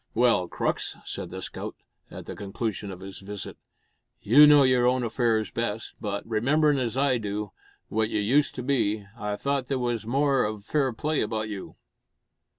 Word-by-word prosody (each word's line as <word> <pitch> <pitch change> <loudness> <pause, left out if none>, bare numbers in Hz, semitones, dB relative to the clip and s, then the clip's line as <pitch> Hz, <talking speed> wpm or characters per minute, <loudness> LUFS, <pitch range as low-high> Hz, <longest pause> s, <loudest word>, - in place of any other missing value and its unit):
"Well, 115 -6 +3
Crux," - - -2
said - - -5
the 95 +1 -7
scout, - - -6 0.3
at - - -9
the - - -7
conclusion 105 0 -4
of 95 -1 -8
his 95 0 -8
visit, 100 0 -7 0.6
"you 145 +8 +7
know 145 -1 +7
your 125 -2 +4
own 125 0 +2
affairs 115 -2 0
best 115 -1 -3
but, 100 -1 -3
rememberin' 140 +6 +2
as 120 -1 -2
I 135 -3 +2
do, 105 -1 -4 0.4
what 110 0 0
you 105 - 0
used 130 +8 +2
to 125 - -4
be, 110 -6 0
I 105 -3 -3
thought 140 +2 -1
there 135 - 0
was 120 -3 -2
more 135 +1 +2
of 105 -1 -4
fair 140 -1 +1
play 150 +7 -1
about 110 0 -2
you." 100 -3 -7
115 Hz, 175 wpm, -26 LUFS, 105-130 Hz, 0.6 s, you